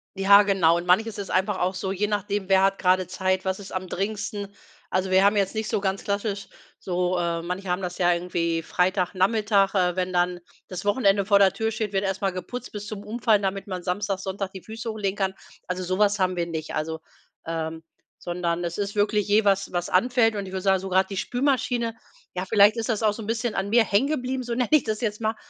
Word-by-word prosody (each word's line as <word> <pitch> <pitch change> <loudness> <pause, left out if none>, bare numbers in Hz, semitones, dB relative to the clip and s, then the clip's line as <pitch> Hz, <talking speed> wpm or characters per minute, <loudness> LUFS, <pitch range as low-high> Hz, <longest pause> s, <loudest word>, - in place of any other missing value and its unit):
Ja, 200 +1 +7
genau. 185 -5 +3
Und 175 +1 -5
manches 220 +4 +2
ist 200 - -5
einfach 190 +1 0
auch 185 +2 0
so, 190 +1 -3
je 200 +2 0
nachdem, 205 -1 -2
wer 190 0 +5
hat 195 0 +2
gerade 185 0 +3
Zeit, 185 0 -1
was 190 +1 -1
ist 200 - -10
am 185 0 -4
dringendsten? 200 +1 -3 0.4
Also, 185 0 -1
wir 190 +1 +5
haben 205 +1 +4
jetzt 195 -1 +1
nicht 220 -1 -3
so - - 0
ganz 195 0 -1
klassisch 200 0 -2 0.3
so 180 0 -1
äh, 170 -1 -1
manche 180 +2 -4
haben 180 +2 0
das 180 -1 -5
ja 175 -1 +4
irgendwie 170 -1 -1
Freitagnachmittag, 195 +3 +1
äh, 180 -2 +2
wenn 185 0 -1
dann 180 0 +1 0.3
das 185 -1 -6
Wochenende 200 -2 +2
vor 200 0 +5
der 195 -1 +5
Tür 225 0 -1
steht, 215 -2 -3
wird 195 0 +1
erst 195 -1 -2
mal 195 -1 +1
geputzt 235 +8 -7
bis 210 0 -7
zum 205 -1 -6
Umfallen, 220 -1 +1
damit 195 +1 -2
man 185 -2 -5
Samstag, 195 +2 -1
Sonntag 190 0 -4
die 190 - -8
Füße 225 +1 -6
hochlegen 205 -3 -2
kann. 190 -1 0 0.3
Also, 180 +1 -3
so 185 +2 -2
was 205 0 +3
haben 185 -2 +1
wir 170 -1 -1
nicht, 160 -2 -5
also 160 +1 -3 0.5
ähm, 160 0 -4 0.4
sondern 175 -1 -2
es 170 0 -4
ist 205 0 -3
wirklich 210 0 +1
je 210 +1 +4
was 195 -1 +2
was 175 -1 -2
anfällt 225 +3 +3
und 200 -1 -3
ich 185 - -9
würde 190 0 -3
sagen, 190 0 +3
so 190 - -5
grad 190 +1 +2
die 195 - -5
Spülmaschine 245 -2 0 0.4
ja, 180 - -2
vielleicht 205 +1 +5
ist 225 0 -3
das 225 -2 0
auch 215 -2 +3
so 225 - -8
'n - - -9
bisschen 230 0 -1
an 195 +1 -1
mir 235 +2 +5
hängen 210 +7 +2
geblieben, 260 -3 -2
so 240 -1 -4
nenne 250 -1 +1
ich 305 -3 +5
das 215 0 -3
jetzt 210 -3 -2
mal, 220 0 0
195 Hz, 235 wpm, -25 LUFS, 185-210 Hz, 0.5 s, Ja